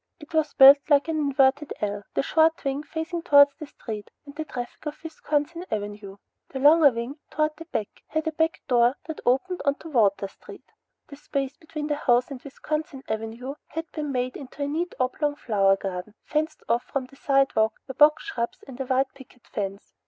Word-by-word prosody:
It 300 +1 -14
was 315 -1 +1
built 275 +1 +10
like 285 +1 +4
an 320 - 0
inverted 280 0 +2
L, 205 -1 -2
the - - +2
short 320 +2 +3
wing 275 0 -1
faced 320 +3 -6
towards 285 -1 +7
the 305 - -7
street 215 -6 -7 0.2
and 285 0 -12
the 315 +1 -4
traffic 245 +2 -7
of 300 +1 -5
Wisconsin 315 +1 -2
Avenue. 205 -1 -5 0.3
The 270 - -6
longer 295 +2 +7
wing, 240 +4 -5
toward 305 0 +1
the 330 - -9
back, 215 -10 -5
had 315 +1 -2
a 320 - 0
back 320 +1 0
door 245 0 +3
that 320 - -6
opened 355 +9 +1
onto 285 +3 -1
Water 205 -7 +2
Street. - - -14 0.4
The 285 - -10
space 275 -1 -3
between 310 -2 -6
the 295 -1 -1
house 245 -1 +2
and 260 -2 -7
Wisconsin 300 0 -5
Avenue 225 +4 -4
had 325 +1 -6
been 300 -3 -4
made 250 -1 -2
into 280 +1 -7
a - - -1
neat 335 +5 -2
oblong 290 +3 0
flower 200 -7 +2
garden, 195 +1 -6
fenced 310 +1 -2
off 235 +1 +2
from 275 -2 -3
the 265 - -18
sidewalk 275 -6 +2
by 265 - -5
box 300 +3 +5
shrubs 235 -13 -4
and 265 -1 -7
a 265 - -4
white 265 +1 +1
picket 260 -3 -17
fence. 200 -1 -5
275 Hz, 195 wpm, -25 LUFS, 245-305 Hz, 0.4 s, built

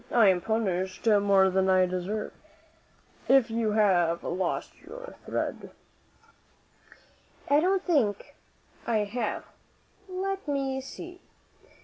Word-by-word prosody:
I 225 -4 +5
am 180 -2 +2
punished 190 -3 -2
more 200 -3 +4
than 190 0 +2
I 185 -1 +5
deserve, 185 +4 -3 0.9
if 260 -4 +4
you 225 -2 0
have 175 -6 +2
lost 185 -1 -2
your - - -10
thread." - - -3 1.8
"I 285 +1 +4
don't 375 +3 +1
think 240 - 0 0.5
I 220 -3 +2
have. 215 +1 -3 0.6
Let 385 0 -3
me 270 -2 -1
see. 355 +6 -10
215 Hz, 105 wpm, -28 LUFS, 190-275 Hz, 1.8 s, I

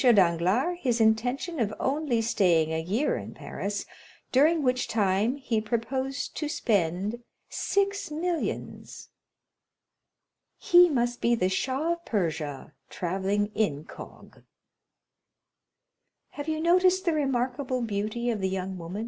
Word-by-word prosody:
Danglars 210 - +3
his 245 -3 +1
intention 245 +9 +1
of 220 -3 +1
only 265 -4 0
staying 170 -8 +2
a 160 - 0
year 210 - 0
in - - -8
Paris, 200 0 -4 0.5
during 305 +4 +4
which 250 -1 +1
time 210 +3 +1
he 240 -6 -1
proposed 260 +5 -3
to 300 - -2
spend 205 - 0 0.3
six 400 -2 -1
millions. 330 +2 -4 1.5
"He 355 0 +6
must 240 -4 0
be 235 0 +3
the 185 -5 +1
Shah 265 - -1
of 340 0 -10
Persia, 155 - -3 0.2
travelling 195 +3 -1
incog." 155 -9 -5 1.9
"Have 290 +1 -7
you 315 0 -1
noticed 365 +3 +3
the 340 - +2
remarkable 255 -2 -1
beauty 220 +3 -2
of 215 -3 -3
the 190 - 0
young 190 0 -4
woman, 170 +3 -6
M. - - -3
235 Hz, 125 wpm, -27 LUFS, 195-290 Hz, 1.9 s, He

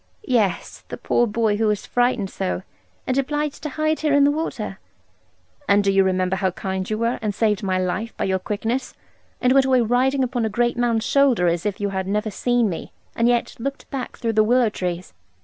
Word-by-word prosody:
'Yes, 225 - 0
the - - -6
poor 240 - +1
boy 215 -1 +1
who 220 0 +1
was 210 -1 -1
frightened 245 -5 0
so, 90 0 -3 0.4
and 260 +1 +1
obliged 295 +1 -2
to 300 - -4
hide 310 +2 0
here 300 -2 +2
in 285 - +5
the 285 - +5
water.' 315 +3 -4 0.9
'And 200 0 +5
do 200 - +2
you 195 0 +4
remember 185 0 0
how 190 +1 +1
kind 190 +1 -4
you 215 - -1
were, 230 +2 0
and 210 -2 -2
saved 210 -2 +1
my 190 -2 0
life 185 +5 -2
by - - -1
your 190 -1 0
quickness, 225 +7 -3 0.4
and 250 +1 +3
went 270 -1 +5
away 255 -2 +4
riding 255 +4 +2
upon 245 -2 -1
a 220 - 0
great 240 +2 +1
man's 235 -2 +1
shoulder, 270 -10 +3
as 170 +3 +1
if 205 +1 -3
you 205 -1 -1
had 190 -1 -3
never 210 +2 -1
seen 245 +2 +1
me, 175 -5 -5 0.2
and 230 - +2
yet 240 -1 +1
looked 275 +4 -5
back 265 -2 -5
through 230 -2 -1
the 215 0 +4
willow 240 +1 +3
trees?' 180 -3 -4
225 Hz, 215 wpm, -22 LUFS, 195-255 Hz, 0.9 s, in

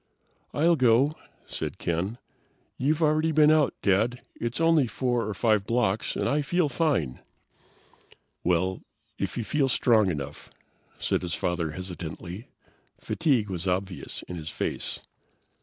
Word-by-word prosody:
"I'll 165 +3 +3
go," 130 +2 +4 0.3
said - - -5
Ken. 90 +7 -2 0.6
"You've 150 +5 +1
already 155 +1 +3
been 155 0 +6
out, 155 -2 +3
Dad. 110 +5 +2
It's 120 +3 -3
only 165 -5 +4
4 120 0 -1
or 110 - -2
5 105 -2 +2
blocks, 110 -3 +1
and - - 0
I 150 +1 +2
feel 170 +2 +1
fine." 130 - 0 1.2
"Well, 90 +2 +1 0.4
if - - -2
you 120 - -1
feel 135 +5 +1
strong 110 -5 +4
enough," 75 -3 -5 0.5
said - - 0
his 90 -2 -2
father 85 -3 -1
hesitantly. 90 +2 -7 0.5
Fatigue 130 - +1
was 90 0 -4
obvious 95 0 -3
in 90 - -7
his 80 -1 -6
face. - - -4
115 Hz, 135 wpm, -27 LUFS, 90-145 Hz, 1.2 s, been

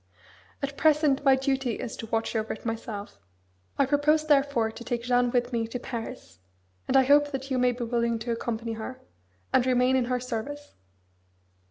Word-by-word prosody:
At 280 0 -3
present 300 -3 +3
my 270 -2 +6
duty 265 -3 -1
is 230 - -5
to 225 - -7
watch 225 +1 -1
over 220 0 -1
it 220 - -12
myself. 220 - -5 0.6
I 275 - +4
propose 300 +3 +2
therefore 275 -6 +2
to 235 - -10
take 235 -1 -3
Jeanne 245 0 +2
with 245 0 0
me 230 -1 0
to 230 - -4
Paris; 225 - -7 0.5
and - - +3
I 265 - +6
hope 290 +2 +5
that 270 -1 -5
you 255 - +1
may 250 0 +4
be 245 0 -5
willing 235 0 0
to 230 +2 -4
accompany 230 0 -3
her, 225 +3 -7 0.5
and 255 - +5
remain 255 0 +3
in 255 -2 +2
her 250 0 -1
service." 255 +4 -5
250 Hz, 185 wpm, -27 LUFS, 230-270 Hz, 0.6 s, my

